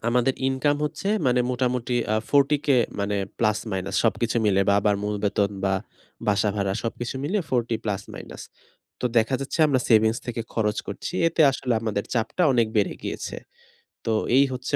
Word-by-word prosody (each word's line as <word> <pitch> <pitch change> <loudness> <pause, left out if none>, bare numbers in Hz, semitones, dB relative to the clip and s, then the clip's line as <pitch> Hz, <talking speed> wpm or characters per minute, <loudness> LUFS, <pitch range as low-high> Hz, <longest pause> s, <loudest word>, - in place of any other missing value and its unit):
আমাদের 125 +2 +2
ইনকাম 145 +2 +1
হচ্ছে 170 +6 -3 0.2
মানে 125 0 +3
মোটামুটি 125 -1 -1 0.2
আ - - +2
40K 145 +1 +3 0.3
মানে 100 0 -1 0.2
প্লাস 110 -2 +2
মাইনাস 95 0 -3
সবকিছু 115 +1 +1
মিলে 100 -1 +3
বা 100 - +5
আবার 105 0 +2
মূল 105 - -1
বেতন 100 0 +1
বা 95 0 +2 0.5
বাসা 105 0 +2
ভাড়া 100 -1 0
সবকিছু 120 +2 -4
মিলে 200 +8 0
40 120 -2 +1
প্লাস 105 -2 -2
মাইনাস। - - -9 0.6
তো - - -4
দেখা 115 +4 +1
যাচ্ছে 135 - -4
আমরা 130 -4 +2
সেভিংস 110 +1 +4
থেকে 120 -1 -3
খরচ 105 -2 0
করছি 100 - -6
এতে 165 -1 +2
আসলে 130 -2 -2
আমাদের 105 -3 -2
চাপটা 120 +9 0
অনেক 120 -3 +3
বেড়ে 105 -2 +2
গিয়েছে। - - -5 0.7
তো 115 - 0 0.3
এই 140 - +6
হচ্ছে 130 +3 -2
115 Hz, 170 wpm, -24 LUFS, 105-130 Hz, 0.7 s, এই